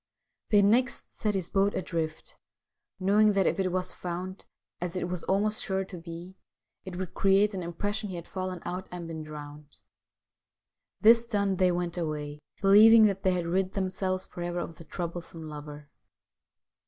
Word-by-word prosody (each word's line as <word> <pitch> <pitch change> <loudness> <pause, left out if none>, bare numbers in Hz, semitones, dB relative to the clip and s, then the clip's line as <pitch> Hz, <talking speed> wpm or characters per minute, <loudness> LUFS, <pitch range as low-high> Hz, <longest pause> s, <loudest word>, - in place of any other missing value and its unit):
They 205 -1 +5
next 240 +4 +2
set 210 -2 -1
his 185 -3 -3
boat 200 +1 +2
adrift, 165 -3 -3 0.6
knowing 205 +3 +4
that 195 -2 +2
if - - +1
it 185 -1 +1
was 185 0 -1
found, 180 +2 -5 0.3
as 175 0 -4
it 180 - -1
was 180 -1 -3
almost 210 +3 +1
sure 190 -1 -1
to 185 - -9
be, 170 +2 -9 0.5
it 185 -2 -7
would 185 0 -5
create 195 +2 +3
an 190 - -3
im 170 0 -5
pression 205 +4 -2
he 185 - -5
had 170 -1 -7
fallen 185 -2 -4
out 180 +2 -4
and 175 -2 -6
been 160 -1 -5
drowned. 150 -1 -10 1.2
This 230 +2 +6
done, 200 -4 0
they 185 0 +4
went 175 0 -2
away, 150 -2 -3 0.2
believing 215 +3 +8
that 195 -2 +1
they 185 - +2
had 175 -1 -1
rid 185 +3 0
themselves 190 -1 -1
for 175 - -9
ever 175 0 -3
of 165 - -7
the 165 - -12
troublesome 170 -2 -6
lover. 150 -1 -9
185 Hz, 175 wpm, -28 LUFS, 170-195 Hz, 1.2 s, believing